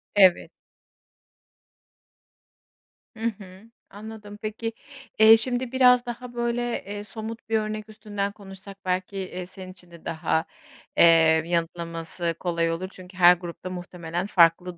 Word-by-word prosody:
Evet. 190 -3 +5 2.6
Hı 225 - -12 0.2
hı. 185 -1 -12 0.3
Anladım, 210 0 -10
peki, 220 +1 -4 0.5
eee, 220 +1 +9
şimdi 245 +2 -1
biraz 250 -1 +5
daha, 240 +1 -7
böyle, 235 0 -1 0.2
eee, 205 +1 -6
somut 220 +2 -8
bir 220 - +3
örnek 215 0 -5
üstünden 205 -2 -4
konuşsak 195 -1 -12
belki, 185 +2 -2
eee, 185 -1 -5
senin 185 0 -10
için 180 -2 -17
de 170 - -15
daha, 160 0 0 0.5
eee, 160 -1 +6
m 165 - -11
yanıtlaması 170 0 -2
kolay 170 -2 0
olur 170 +3 -3
çünkü 185 0 -13
her 180 -1 +8
grupta 175 +1 -7
muhtemelen 175 -1 -5
farklı 175 -1 +3
190 Hz, 130 wpm, -25 LUFS, 175-220 Hz, 2.6 s, eee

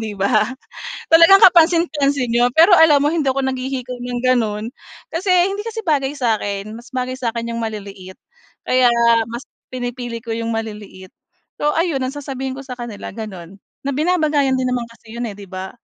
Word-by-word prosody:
'di 215 -2 -5
ba? 210 +3 +2 0.6
Talagang 335 +4 +7
kapansin-pansin 320 -6 +4
'yon, 245 +1 +3
pero 335 +6 +6
alam 315 -3 +6
mo 290 - +2
hindi 315 -1 0
ako 275 - -2
naghihikaw 260 -1 -3
ng 245 0 -5
gano'n. 220 -4 +1 0.4
Kasi 370 +3 -1
hindi 390 +3 +2
kasi 450 -1 -5
bagay 290 -7 0
sa'kin 215 -6 -2
mas 235 +3 -14
bagay 255 0 -3
sa'kin 235 -2 -3
'yung 230 - -4
maliliit 200 -4 -8 0.5
kaya 255 -1 +4 0.4
mas 240 +3 -6 0.2
pinipili 245 -2 -5
ko 230 - -4
'yung 230 0 -3
maliliit. 210 -4 -6 0.5
So 295 - +2
ayun 330 -4 0
ang 260 +2 -3
sasabihin 265 -2 -5
ko 275 - -8
sa 260 - -7
kanila 240 -6 -8
gano'n, 190 -5 -8 0.3
na - - +1
binabagayan 300 -4 +1
din 260 - -1
naman 245 -2 -2
kasi 230 -1 -16
'yun, 235 0 -3
eh, 205 - -8
'di 200 - -9
ba 185 0 -7
255 Hz, 175 wpm, -19 LUFS, 225-290 Hz, 0.6 s, Talagang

